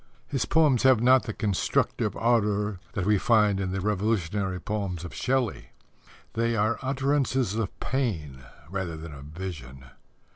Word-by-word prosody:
His 135 -3 -1
poems 150 -6 +3
have 130 -3 +5
not 130 +2 +5
the - - -1
constructive 100 -3 0
ardour 105 -4 +1
that 95 - -2
we 105 -1 +3
find 105 -3 +3
in 95 -1 -2
the 95 0 -2
revolutionary 100 -2 0
poems 95 -3 -3
of 85 - -8
Shelley. 130 -4 -1 0.6
They 115 0 0
are 110 +1 +1
utterances 135 -3 0
of 110 -3 -3
pain 85 - -2 0.3
rather 90 -2 -4
than 80 -1 -8
of 70 -1 -10
vision. 75 -6 -8
105 Hz, 145 wpm, -27 LUFS, 90-120 Hz, 0.6 s, have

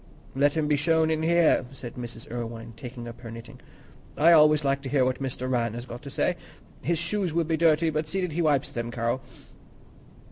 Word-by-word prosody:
"Let 140 +2 +3
him 155 -1 +1
be 150 -1 +2
shown 160 +2 +2
in 160 0 0
here," 170 -3 +4
said 120 -3 -8
Mrs. 120 +2 -8
Irwine, 115 -1 -6
taking 120 0 -8
up 120 +1 -10
her 115 - -8
knitting. 115 0 -10 0.6
"I 165 +3 +6
always 150 -2 +6
like 140 0 +1
to 135 - -6
hear 135 -2 +3
what 130 +1 -1
Mr. 130 -1 -3
Rann 120 -3 0
has 120 +1 -6
got 120 -1 -8
to 140 - -8
say. 175 +5 0 0.4
His 170 0 0
shoes 170 0 -1
will 170 - +3
be 160 0 0
dirty, 160 0 +3
but 155 0 -2
see 190 +5 -2
that 180 -2 -2
he 170 +3 -1
wipes 150 -3 +1
them 120 0 -4
Carroll." 120 +2 -1
140 Hz, 215 wpm, -26 LUFS, 120-160 Hz, 0.6 s, I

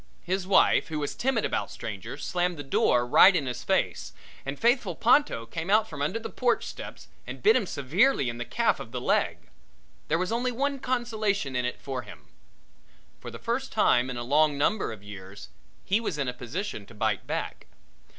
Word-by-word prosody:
His 185 +1 -2
wife 195 - +4
who 160 - -4
was 145 -1 -2
timid 265 +3 0
about - - -1
strangers, - - -7
slammed 180 -1 0
the 145 - -5
door 125 -2 +2
right 180 +10 +7
in 145 - 0
his 125 -1 -4
face - - -1 0.3
and 140 +1 -3
faithful 235 - +2
Ponto 235 - +3
came 160 +9 -5
out 215 +2 +4
from 145 -6 -7
under 150 +10 0
the 225 - -5
porch 245 -2 +1
steps - - -9 0.2
and - - -8
bit 435 +2 +6
him 205 - +1
severely 155 - +2
in 120 0 -4
the - - -2
calf - - +1
of - - -8
the - - -3
leg. - - 0 0.6
There 160 - +2
was 185 +4 -2
only 245 +2 0
one 275 +3 -1
consolation 220 - -1
in 125 0 0
it 125 - -3
for 130 -2 -4
him - - -13 0.9
for - - -8
the - - -8
first - - -3
time 125 +1 +3
in 125 - -4
a 120 - -3
long 145 +3 +3
number 170 - +1
of 105 -3 -10
years 100 -1 -10 0.4
he 200 +3 +2
was 215 -9 -3
in 135 -3 -1
position 125 - -5
to 120 - -15
bite 105 -2 -1
back. - - -4
160 Hz, 200 wpm, -27 LUFS, -, 0.9 s, right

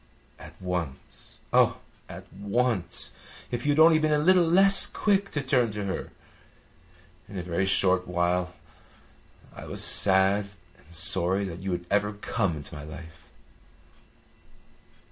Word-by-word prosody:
At - - -14
once 90 -7 -7
oh, - - +3 0.3
at - - -10
once! 100 0 -1 0.4
If 120 +3 -4
you - - +3
had - - -3
only 160 0 +6
been 155 0 0
a 150 - +3
little 175 +3 +3
less 195 +3 +6
quick 200 -1 0
to 145 - -2
turn 130 -3 +1
to 105 -1 -4
her! 95 - -5 1.2
In 100 - -8
a 90 - -4
very 90 +2 -2
short 95 -1 +2
while 90 +1 -1 1.0
I - - -10
was - - -4
sad 100 +1 +3 0.3
and - - -27
sorry 90 +3 +1
that 90 -3 -6
you 95 +1 -5
had 90 0 -4
ever 105 +1 +1
come 105 -3 -2
into 70 -2 -11
my 75 -1 -8
life." 80 +1 -12
95 Hz, 145 wpm, -26 LUFS, 90-125 Hz, 1.2 s, only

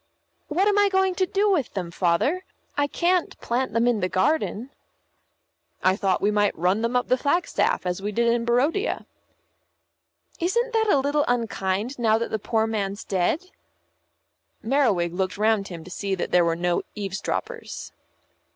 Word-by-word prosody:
"What 365 +6 +1
am 410 0 +3
I 405 0 +4
going 380 -1 +2
to 375 0 0
do 405 +2 +1
with 300 - 0
them, 180 -3 -3
Father? 185 - +1 0.3
I 285 0 +1
can't 350 +3 0
plant 245 0 -1
them 230 +1 +2
in 240 -3 +2
the 185 - -1
garden." 245 +4 0 1.1
"I 185 0 +4
thought 195 -2 0
we 205 - +3
might 205 -1 +1
run 185 +5 +1
them 230 +2 -1
up 250 - +1
the 255 - +2
flagstaff, 320 - +1
as 180 +1 -2
we 205 +1 -2
did 235 +3 +1
in 235 -1 0
Barodia." 275 - +1 1.3
"Isn't 470 +8 0
that 440 -1 +2
a 290 - +5
little 285 +2 +1
unkind 230 0 -1
now 220 -2 +3
that 230 - -3
the 220 - -1
poor 220 +2 0
man's 205 -2 -3
dead?" 205 - -1 1.1
Merriwig 220 -10 +2
looked 185 +1 -2
round 215 -1 +2
him 170 -3 -8
to 180 - -12
see 195 +1 -2
that 180 - -4
there 175 -1 +4
were 165 0 +1
no 175 +1 0
eavesdroppers. 195 -2 -4
230 Hz, 170 wpm, -24 LUFS, 190-295 Hz, 1.3 s, a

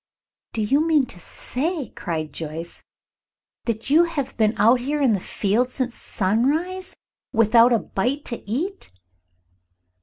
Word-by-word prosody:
"Do 220 - -1
you 275 +9 +3
mean 305 -5 +4
to 180 - -11
say," 290 - -2
cried 155 -4 -4
Joyce, 165 +1 -6 0.8
"that 230 +2 -2
you 330 +4 +6
have 290 -6 -4
been 215 -1 +2
out 230 +5 +5
here 290 +4 -2
in 265 -6 +3
the 200 - +1
field 215 +7 0
since 255 -1 -3
sunrise 310 - -1 0.4
without 230 +1 +5
a 235 - +5
bite 255 +8 -2
to 235 - -1
eat?" 345 - -3
245 Hz, 140 wpm, -23 LUFS, 210-290 Hz, 0.8 s, you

